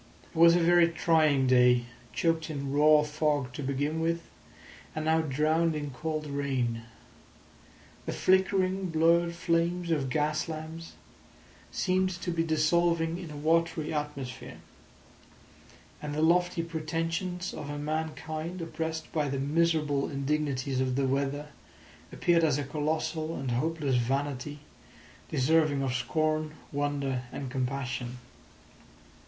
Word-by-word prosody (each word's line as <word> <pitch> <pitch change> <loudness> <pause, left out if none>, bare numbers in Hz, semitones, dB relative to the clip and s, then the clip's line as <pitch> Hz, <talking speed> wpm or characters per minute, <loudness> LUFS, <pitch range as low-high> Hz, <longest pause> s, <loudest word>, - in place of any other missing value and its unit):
It - - -23
was 170 +1 +7
a - - +4
very 170 0 +5
trying 155 -5 +3
day, 125 -1 +5 0.3
choked 165 -1 0
in 140 -3 -4
raw 150 +1 +5
fog 150 -4 -1
to 145 - -5
begin 145 +3 -1
with, 165 +1 0 0.7
and 155 0 -2
now 160 +1 +3
drowned 155 +3 +1
in 145 -2 -4
cold 155 +3 -3
rain. 130 -5 -2 1.2
The - - -1
flickering, 190 0 +2
blurred 170 +1 +3
flames 170 +1 0
of 140 -5 0
gas 150 +4 0
lamps 160 +1 -7 0.8
seemed 185 0 +1
to 175 - -3
be 165 -1 0
dissolving 165 +1 +2
in 175 -3 -7
a 150 - -8
watery 165 +1 +1
atmosphere. 145 -4 -5 1.4
And 150 -1 -4
the 155 - +1
lofty 175 +1 +3
pretensions 165 +2 -3
of 145 - -6
a 145 - -4
mankind 155 +3 -4
oppressed 160 0 -4
by 150 -3 0
the 135 - -2
miserable 150 -1 +1
indignities 140 -2 -1
of 130 -1 0
the 135 0 +1
weather 140 +2 -1 0.6
appeared 170 -1 +2
as 150 -4 +3
a 145 - -1
colossal 155 +2 -2
and 135 -2 -3
hopeless 145 +1 0
vanity 140 +3 -2 0.7
deserving 150 0 +2
of 130 -2 -1
scorn, 155 +4 0 0.2
wonder, 140 -3 -1
and 135 -3 -5
compassion. 125 -2 -3
155 Hz, 125 wpm, -29 LUFS, 140-165 Hz, 1.4 s, was